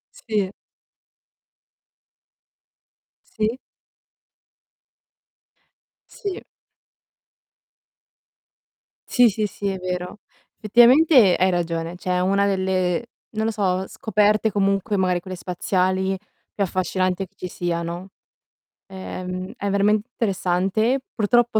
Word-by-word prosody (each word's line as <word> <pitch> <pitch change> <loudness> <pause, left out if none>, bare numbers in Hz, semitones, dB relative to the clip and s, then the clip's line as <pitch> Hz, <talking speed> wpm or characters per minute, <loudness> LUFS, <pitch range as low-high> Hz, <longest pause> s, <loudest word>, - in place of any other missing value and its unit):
Sì. 205 -4 -2 2.8
Sì. 220 +3 -1 2.5
Sì. 395 -2 -6 2.6
Sì, 245 -1 +5
sì, 210 +1 -1
sì, 205 0 -6
è 195 - -2
vero. 180 +1 -4 0.4
Effettivamente 240 - +6
hai 185 +1 +3
ragione, 170 -1 -2
cioè 185 - -5
è - - +1
una 200 +2 +2
delle, 190 +1 0 0.3
non 220 0 -1
lo 225 - +1
so, 190 -3 0
scoperte 215 +1 +1
comunque, 200 +1 +1
magari 185 -2 +1
quelle 185 +1 -7
spaziali, 185 +1 0 0.4
più 200 - +1
affascinante 185 0 -1
che 190 - -36
ci - - -6
siano. 175 +1 -3 0.8
Ehm, 185 0 -6
è 200 - -2
veramente 205 +2 +2
interessante. 195 +4 0
Purtroppo, 235 +1 +2
195 Hz, 90 wpm, -23 LUFS, 185-215 Hz, 2.8 s, Effettivamente